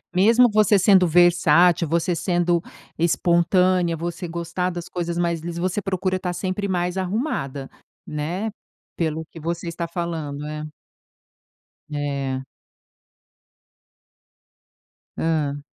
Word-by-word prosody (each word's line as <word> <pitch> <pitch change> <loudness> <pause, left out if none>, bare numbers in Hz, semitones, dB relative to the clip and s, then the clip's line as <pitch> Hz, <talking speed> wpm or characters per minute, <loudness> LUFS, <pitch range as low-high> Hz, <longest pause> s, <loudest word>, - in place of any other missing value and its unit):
Mesmo 230 +6 +5
você 210 -1 +4
sendo 190 -2 +5
versátil, 175 0 +4
você 170 +3 0
sendo 175 0 +1 0.4
espontânea, 175 +1 +2
você 175 +2 -4
gostar 170 +2 -2
das 175 -1 -6
coisas 170 -1 -3
li 170 -1 -1
você 185 +4 -1
procura 185 -1 -1
estar 180 -1 -3
sempre 190 +3 -2
mais 180 0 -1
arrumada, 180 - -2 0.4
né, 170 +9 -3 0.4
pelo 160 -1 -2
que 165 - -10
você 170 +2 -4
está 170 0 -4
falando, 160 -4 -4
é. 150 0 -5 1.3
É. 140 -2 -2 2.7
Hã. 145 -3 -1
170 Hz, 105 wpm, -23 LUFS, 160-185 Hz, 2.7 s, Mesmo